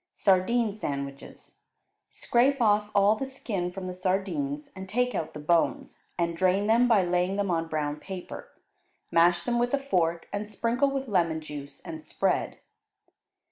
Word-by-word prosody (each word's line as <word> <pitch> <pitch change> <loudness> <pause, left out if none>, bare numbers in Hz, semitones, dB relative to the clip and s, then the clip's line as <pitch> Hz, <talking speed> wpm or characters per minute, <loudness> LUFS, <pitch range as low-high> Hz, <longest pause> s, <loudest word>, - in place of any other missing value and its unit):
Sardine 205 +3 +2
Sandwiches 140 -8 -7 0.5
Scrape 265 +3 +2
off 210 -2 +3
all 200 +2 +5
the 270 +4 -4
skin 200 -9 -3
from 190 0 -7
the 185 - -4
sardines, 275 - -2
and 190 0 -8
take 250 +3 +1
out 160 -4 -3
the - - -5
bones 165 +3 0
and 170 -1 0
drain 185 +3 +2
them 230 +3 +4
by 220 -5 +4
laying 180 +2 +1
them 200 -2 0
on 165 -1 0
brown 150 -2 -2
paper; 185 +3 -8 0.6
mash 170 +1 +4
them 240 +3 0
with 245 +3 +2
a - - -2
fork, 170 -11 0
and 205 +1 -3
sprinkle 235 +6 +1
with 275 -1 -3
lemon 170 -6 +1
juice, 145 -2 -9
and 320 -1 -8
spread. - - -1
195 Hz, 160 wpm, -27 LUFS, 170-240 Hz, 0.6 s, all